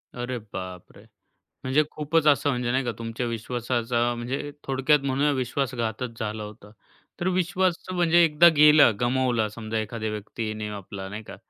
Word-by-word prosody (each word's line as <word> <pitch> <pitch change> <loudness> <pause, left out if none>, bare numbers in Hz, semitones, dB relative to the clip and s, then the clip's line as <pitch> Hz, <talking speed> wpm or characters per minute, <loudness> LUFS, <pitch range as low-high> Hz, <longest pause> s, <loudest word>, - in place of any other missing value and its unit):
अरे 125 0 -4 0.2
बापरे! 90 -1 -8 0.6
म्हणजे 130 +4 +3
खूपच 155 +1 0
असं 145 -1 +4
म्हणजे, 125 -2 -1
नाही 130 +1 +1
का, 120 - -1
तुमच्या 115 +1 -4
विश्वासाचा 120 +1 -1
म्हणजे 130 +5 -4
थोडक्यात 135 +2 +2
म्हणूया 140 +2 +1
विश्वासघातच 125 -3 -3
झाला 110 0 -3
होता. 105 0 -12 0.5
तर 175 - 0
विश्वासचं 185 0 0
म्हणजे 175 -1 +4
एकदा 165 +1 +6
गेला, 150 -3 +7
गमावला 120 -2 +1
समजा 110 +1 -5
एखाद्या 110 0 -3
व्यक्तीने 110 0 -5
आपला, 100 -1 -7
नाही 105 +3 -7
का, - - -11
125 Hz, 145 wpm, -25 LUFS, 110-145 Hz, 0.6 s, गेला